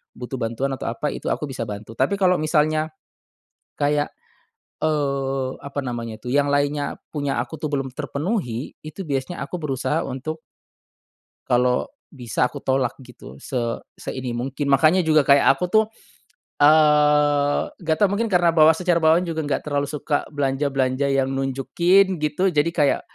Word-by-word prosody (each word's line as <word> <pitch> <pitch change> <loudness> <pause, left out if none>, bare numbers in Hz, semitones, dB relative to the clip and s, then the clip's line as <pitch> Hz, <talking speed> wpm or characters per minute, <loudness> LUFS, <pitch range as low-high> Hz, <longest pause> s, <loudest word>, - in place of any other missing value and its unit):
butuh 125 +1 -6
bantuan 120 +4 -2
atau 130 - -4
apa 130 +5 -2
itu - - -6
aku - - -1
bisa 115 -3 -4
bantu. 105 +1 -7
Tapi 135 +9 +2
kalo 185 -2 +2
misalnya 155 0 +1 0.9
kayak, 145 0 +1 0.8
eee, 135 -3 0
apa 140 0 -6
namanya 115 -3 -5
tuh 125 - -6
yang 140 +2 +2
lainnya 145 0 0 0.2
punya 145 -5 -1
aku 130 +6 -7
tuh 150 -1 -4
belum 135 -1 -1
terpenuhi, 145 - -3
itu 155 +5 -7
biasanya 145 0 -3
aku 155 +6 -4
berusaha 135 -5 -2
untuk 155 +5 -5 1.1
kalo 125 - +1 0.2
bisa 125 -6 -1
aku 145 - -8
tolak 130 -1 0
gitu 125 - -13
se 130 - -8 0.4
se - - -6
ini 130 -2 -4
mungkin. 135 +4 -3
Makanya 155 +6 +5
juga 155 -2 +4
kayak 140 -1 +6
aku 180 - -1
tuh, 220 0 +5 0.8
eee, 150 -1 +4 0.2
nggak 160 -2 0
tahu 205 - +5
mungkin 230 +2 0
karena 175 -2 +4
bawa 160 0 +6
secara 175 0 +1
bawaan 160 +3 +4
juga 160 -1 -2
nggak 145 - -1
terlalu 145 -1 -1
suka 145 0 -2
belanja-belanja 135 -1 0
yang 135 -1 +1
nunjukin 170 +9 +2
gitu 155 +6 +1
jadi 150 +2 +2
kayak 150 -4 +2
145 Hz, 155 wpm, -22 LUFS, 135-155 Hz, 1.1 s, kayak